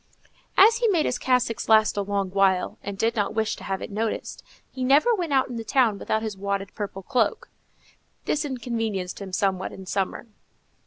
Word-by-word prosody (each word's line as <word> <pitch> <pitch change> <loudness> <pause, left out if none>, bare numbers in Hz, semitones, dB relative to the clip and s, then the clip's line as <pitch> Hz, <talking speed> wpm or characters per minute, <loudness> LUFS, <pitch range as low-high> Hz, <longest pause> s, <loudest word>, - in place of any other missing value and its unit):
As 445 +4 +7
he 480 -1 +2
made 345 -7 +2
his 245 - -1
cassocks 250 -4 0
last 220 -1 +5
a 205 - 0
long 200 -1 -2
while, 195 -1 +1
and 200 -1 -6
did 230 +3 +1
not 205 -1 -1
wish 220 -1 0
to - - -11
have 195 -1 -3
it - - -7
noticed, 220 +2 -3 0.3
he 260 - -5
never 285 - +4
went 350 -7 -2
out 265 -2 +3
in 245 -2 -6
the 225 - -4
town 225 -2 +2
without 220 0 -1
his 215 -2 -3
wadded 200 0 -3
purple 195 -2 -6
cloak. 235 0 0 0.8
This 300 - 0
inconvenienced 225 -9 -3
him 195 -1 -7
somewhat 190 -1 0
in 190 - -10
summer. 195 +3 -2
220 Hz, 195 wpm, -25 LUFS, 195-255 Hz, 0.8 s, As